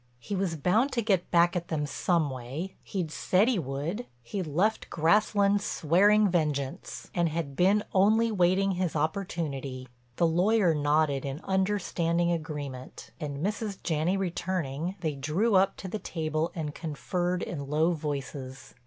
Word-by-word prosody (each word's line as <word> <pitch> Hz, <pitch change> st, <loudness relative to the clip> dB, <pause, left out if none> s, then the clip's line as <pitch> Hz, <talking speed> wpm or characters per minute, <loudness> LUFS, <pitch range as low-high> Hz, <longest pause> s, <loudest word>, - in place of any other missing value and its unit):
He 160 Hz, -, -5 dB
was 185 Hz, -3 st, -1 dB
bound 215 Hz, -, +2 dB
to 235 Hz, -, 0 dB
get 195 Hz, -5 st, +1 dB
back 175 Hz, +1 st, +4 dB
at 175 Hz, -1 st, -2 dB
them 150 Hz, -2 st, -1 dB
some 160 Hz, 0 st, 0 dB
way, 130 Hz, +9 st, -5 dB
he'd 180 Hz, -6 st, -4 dB
said 190 Hz, +6 st, +2 dB
he 245 Hz, -6 st, +2 dB
would—he'd 150 Hz, -, -4 dB
left 190 Hz, +9 st, 0 dB
Grasslands 200 Hz, +4 st, +3 dB
swearing 205 Hz, +6 st, +4 dB
vengeance, 150 Hz, -6 st, -2 dB
and 170 Hz, -2 st, +1 dB
had 155 Hz, -3 st, -3 dB
been 195 Hz, +6 st, +3 dB
only 220 Hz, +4 st, +4 dB
waiting 190 Hz, 0 st, +3 dB
his 180 Hz, -3 st, -1 dB
opportunity. 150 Hz, -6 st, -3 dB, 0.3 s
The 170 Hz, -, +2 dB
lawyer 180 Hz, +2 st, +3 dB
nodded 145 Hz, -2 st, +1 dB
in 140 Hz, +1 st, -4 dB
understanding 180 Hz, -3 st, +1 dB
agreement 145 Hz, -8 st, -5 dB
and, 145 Hz, +1 st, -3 dB
Mrs. 210 Hz, -1 st, -2 dB
Janney 165 Hz, +3 st, +1 dB
returning, 175 Hz, -3 st, -2 dB
they 155 Hz, -3 st, -1 dB
drew 155 Hz, +11 st, 0 dB
up 190 Hz, 0 st, +4 dB
to 190 Hz, -, -6 dB
the 210 Hz, +3 st, -4 dB
table 155 Hz, -2 st, -2 dB
and 155 Hz, -3 st, -3 dB
conferred 175 Hz, +4 st, -2 dB
in 140 Hz, -5 st, -5 dB
low 155 Hz, +3 st, +3 dB
voices. 140 Hz, -4 st, -5 dB
170 Hz, 145 wpm, -28 LUFS, 150-195 Hz, 0.3 s, back